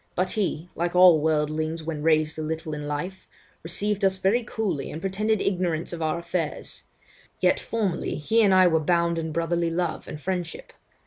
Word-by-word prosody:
But 185 Hz, 0 st, 0 dB
he 180 Hz, -6 st, -2 dB
(like 175 Hz, +1 st, -2 dB
all 180 Hz, -3 st, +7 dB
worldlings 155 Hz, +1 st, 0 dB
when 155 Hz, -2 st, -4 dB
raised 155 Hz, 0 st, +2 dB
a -, -, -2 dB
little 160 Hz, 0 st, -4 dB
in 150 Hz, -1 st, -5 dB
life) 180 Hz, +6 st, -5 dB, 0.3 s
received 200 Hz, +5 st, -2 dB
us 190 Hz, -1 st, +3 dB
very 205 Hz, +6 st, +2 dB
coolly, 210 Hz, -, -3 dB
and 155 Hz, -, -6 dB
pretended 205 Hz, +4 st, 0 dB
ignorance 175 Hz, -4 st, -1 dB
of 170 Hz, -, -5 dB
our 160 Hz, +1 st, 0 dB
affairs; 170 Hz, -2 st, -4 dB, 0.6 s
yet -, -, +3 dB
formerly, 210 Hz, -6 st, -2 dB
he 220 Hz, +10 st, +2 dB
and 205 Hz, -3 st, +4 dB
I 185 Hz, -1 st, +6 dB
were 160 Hz, -2 st, +4 dB
bound 170 Hz, +1 st, +1 dB
in 160 Hz, -1 st, -3 dB
brotherly 170 Hz, +1 st, 0 dB
love 170 Hz, 0 st, -2 dB
and 150 Hz, -, -7 dB
friendship. 175 Hz, 0 st, -4 dB
170 Hz, 180 wpm, -25 LUFS, 155-190 Hz, 0.6 s, all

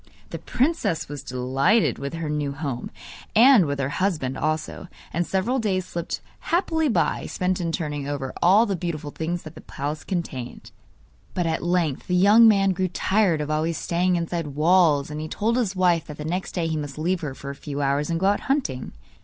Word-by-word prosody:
The -, -, -5 dB
princess 245 Hz, -, 0 dB
was 145 Hz, -1 st, -6 dB
delighted 135 Hz, -, +1 dB
with 140 Hz, +3 st, -4 dB
her 165 Hz, -1 st, -4 dB
new 150 Hz, -2 st, -2 dB
home, 140 Hz, -4 st, -4 dB, 0.5 s
and 230 Hz, -, +7 dB
with 140 Hz, 0 st, -2 dB
her 135 Hz, 0 st, 0 dB
husband 155 Hz, -10 st, 0 dB
also; 155 Hz, +5 st, -2 dB, 0.3 s
and 175 Hz, 0 st, 0 dB
several 225 Hz, +8 st, 0 dB
days 190 Hz, -5 st, 0 dB
slipped 170 Hz, -2 st, -4 dB, 0.2 s
happily 320 Hz, -3 st, +1 dB
by, 230 Hz, -, 0 dB
spent 185 Hz, 0 st, -1 dB
in 170 Hz, -1 st, -1 dB
turning 150 Hz, -4 st, -3 dB
over 140 Hz, -2 st, -4 dB
all 200 Hz, +6 st, +6 dB
the 200 Hz, -3 st, -1 dB
beautiful 160 Hz, -4 st, -4 dB
things 170 Hz, +3 st, -3 dB
that 155 Hz, -, -9 dB
the -, -, -12 dB
palace 145 Hz, +2 st, -5 dB
contained. 150 Hz, -10 st, -5 dB, 0.6 s
But 180 Hz, -, 0 dB
at 160 Hz, -1 st, -1 dB
length 175 Hz, -5 st, 0 dB
the 180 Hz, -, +1 dB
young 205 Hz, +5 st, +7 dB
man 195 Hz, -3 st, +4 dB
grew 185 Hz, 0 st, 0 dB
tired 185 Hz, -2 st, +1 dB
of 150 Hz, 0 st, -3 dB
always 155 Hz, +1 st, 0 dB
staying 180 Hz, +1 st, +1 dB
inside 170 Hz, -1 st, -2 dB
walls, 150 Hz, -1 st, +3 dB
and 150 Hz, +1 st, -4 dB
he 155 Hz, -, -4 dB
told 220 Hz, +8 st, 0 dB
his 220 Hz, -6 st, 0 dB
wife 175 Hz, -3 st, +2 dB
that 150 Hz, -, -8 dB
the 150 Hz, -, -6 dB
next 180 Hz, +4 st, -3 dB
day 175 Hz, -3 st, -1 dB
he 160 Hz, -1 st, -1 dB
must 145 Hz, -2 st, -5 dB
leave 175 Hz, +3 st, 0 dB
her 140 Hz, -4 st, -4 dB
for 140 Hz, +1 st, -7 dB
a -, -, -6 dB
few 140 Hz, 0 st, -6 dB
hours, 140 Hz, +2 st, 0 dB
and 165 Hz, -1 st, 0 dB
go 190 Hz, -, 0 dB
out 200 Hz, +1 st, +3 dB
hunting. 160 Hz, -, -1 dB
170 Hz, 205 wpm, -24 LUFS, 145-190 Hz, 0.6 s, and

